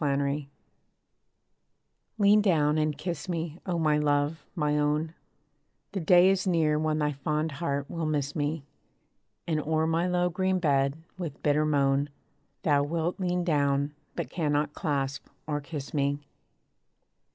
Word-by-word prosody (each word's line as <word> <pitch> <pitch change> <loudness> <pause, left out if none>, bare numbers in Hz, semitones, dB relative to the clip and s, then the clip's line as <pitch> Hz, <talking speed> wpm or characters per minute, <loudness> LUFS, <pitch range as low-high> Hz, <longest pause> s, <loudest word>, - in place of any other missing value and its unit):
PARTING 140 0 0 1.7
Lean 210 0 +5
down, 155 -6 +3
and 155 -1 0
kiss 170 +1 -4
me, 165 -1 -3
O 175 -2 0
my 155 -2 +2
love, 145 +1 +1
my 150 -3 +1
own; 150 +2 0 0.8
The 195 - -2
day 180 +2 +6
is 195 0 0
near 155 -4 +2
when 155 0 0
thy 150 -1 +1
fond 150 +3 -1
heart 140 -1 -2
will 165 -2 -3
miss 145 -2 -1
me; 150 0 -1 0.8
And 155 -2 0
o'er 160 +1 +1
my 165 +2 +1
low 180 0 +1
green 190 +2 +1
bed, 140 -4 +2 0.2
with 165 -6 -6
bitter 150 +1 +3
moan, 140 -1 +2 0.5
Thou 145 -2 +3
wilt 165 +5 -1
lean 180 -1 0
down, 145 -3 +1 0.2
but - - -4
cannot 150 -3 0
clasp 140 -4 -2 0.2
or 150 -1 -2
kiss 145 -1 -7
me. 140 -1 +1
150 Hz, 140 wpm, -28 LUFS, 145-170 Hz, 1.7 s, day